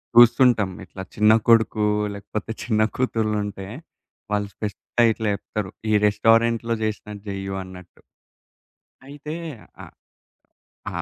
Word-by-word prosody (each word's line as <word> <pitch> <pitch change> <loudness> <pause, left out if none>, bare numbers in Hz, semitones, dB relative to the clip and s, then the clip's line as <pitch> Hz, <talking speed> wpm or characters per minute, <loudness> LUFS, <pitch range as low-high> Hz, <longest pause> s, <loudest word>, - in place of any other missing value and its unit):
చూస్తుంటాం. 120 -3 +6 0.2
ఇట్లా 95 +1 -9
చిన్న 105 +1 +5 0.2
కొడుకు, 110 -2 +4 0.3
లేకపోతే 105 +2 -6
చిన్న 110 -3 +1
కూతుర్లుంటే, 105 -5 -1 0.7
వాళ్ళు 105 -1 0
స్పెస్టయి 115 +3 0
ఇట్లా 110 -1 -2
చేప్తరు. 100 -1 -4 0.2
ఈ - - +2
రెస్టారెంట్‌లో 115 +2 +3
జేసినట్టు 105 -1 -4
జేయ్యు 95 0 -4
అన్నట్టు. 90 -1 -13 1.1
అయితే, 145 +2 -7 0.5
ఆ - - -8 1.1
ఆ! - - -3
110 Hz, 105 wpm, -23 LUFS, 100-115 Hz, 1.1 s, చూస్తుంటాం